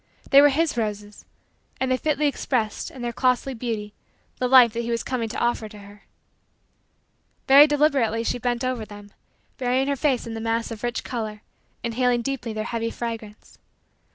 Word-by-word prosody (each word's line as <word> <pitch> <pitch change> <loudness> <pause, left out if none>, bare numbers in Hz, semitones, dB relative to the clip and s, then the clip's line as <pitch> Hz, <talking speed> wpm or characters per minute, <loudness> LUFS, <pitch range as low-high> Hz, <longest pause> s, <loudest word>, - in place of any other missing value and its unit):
They 275 0 +9
were 290 - +7
his 305 -1 0
roses; 210 -2 -4 0.5
and 260 0 0
they - - +4
fitly 300 +2 0
expressed, 250 -6 -1
in 255 - -10
their 240 0 -3
costly 255 +2 +1
beauty, 220 -3 -4 0.5
the 250 - +1
life 245 -3 +7
that 235 - -3
he 235 - -5
was 230 -1 -1
coming 240 -3 -2
to 235 - -5
offer 235 -2 -1
to 210 - -13
her. 205 0 -15 1.4
Very 280 +3 +9
deliberately 280 -7 +2
she 245 - -2
bent 240 +1 -1
over 255 -3 -2
them, 205 -1 -12 0.5
burying 255 +1 +1
her 280 - +1
face 270 -3 0
in 230 - -6
the 225 - -5
mass 230 +1 -1
of 220 -2 -7
rich 240 -1 -2
color, 215 -3 -5 0.4
inhaling 240 +1 +1
deeply 250 -3 -3
their 215 0 -3
heavy 230 0 -3
fragrance. 225 -3 -7
235 Hz, 180 wpm, -24 LUFS, 225-260 Hz, 1.4 s, They